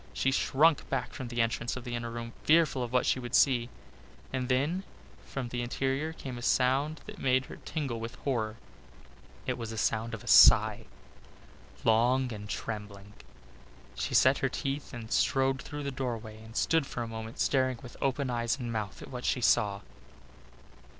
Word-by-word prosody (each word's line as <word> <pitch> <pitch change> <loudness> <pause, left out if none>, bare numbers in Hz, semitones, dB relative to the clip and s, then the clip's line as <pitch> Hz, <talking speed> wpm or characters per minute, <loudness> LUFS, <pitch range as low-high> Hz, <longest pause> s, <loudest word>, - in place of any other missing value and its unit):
She 135 - +1
shrunk 145 +3 +3
back - - -2
from 130 - -6
the 120 -1 0
entrance 115 +1 -2
of 125 - -7
the 120 -1 -6
inner 120 0 -3
room, 115 0 -6
fearful 155 -4 +4
of 120 -1 -3
what 125 0 +2
she - - +2
would 120 -1 -3
see. 120 -3 +4 0.6
And 130 -1 -2
then 145 +9 +1 0.5
from 130 -3 -4
the 120 0 -3
interior 135 +5 -1
came 130 -6 -7
a - - -9
sound 135 +5 +1
that - - -10
made 130 0 +2
her - - -10
tingle 140 -8 -4
with 115 +2 -6
horror. 110 -6 -1 0.9
It - - -2
was 115 -1 -5
a 110 - -6
sound 110 +1 0
of - - -11
a - - -14
sigh, - - +7 1.0
long 125 +3 +3
and 105 -1 -8
trembling. 105 -2 -6 0.8
She - - -3
set - - +5
her - - +1
teeth 140 +1 -3
and 115 -3 -8
strode 135 0 +2
through 145 0 -6
the 140 - -2
doorway 115 -4 -5
and 110 +1 -13
stood 165 -4 +2
for 120 - -4
a - - -5
moment 110 +1 -7
staring 130 -2 +2
with 120 - -10
open 135 -1 0
eyes 120 +2 0
and 120 -3 -4
mouth 105 -3 -4
at - - -11
what 125 -1 -6
she - - +1
saw. 100 -4 +2
125 Hz, 185 wpm, -30 LUFS, 115-135 Hz, 1.0 s, sigh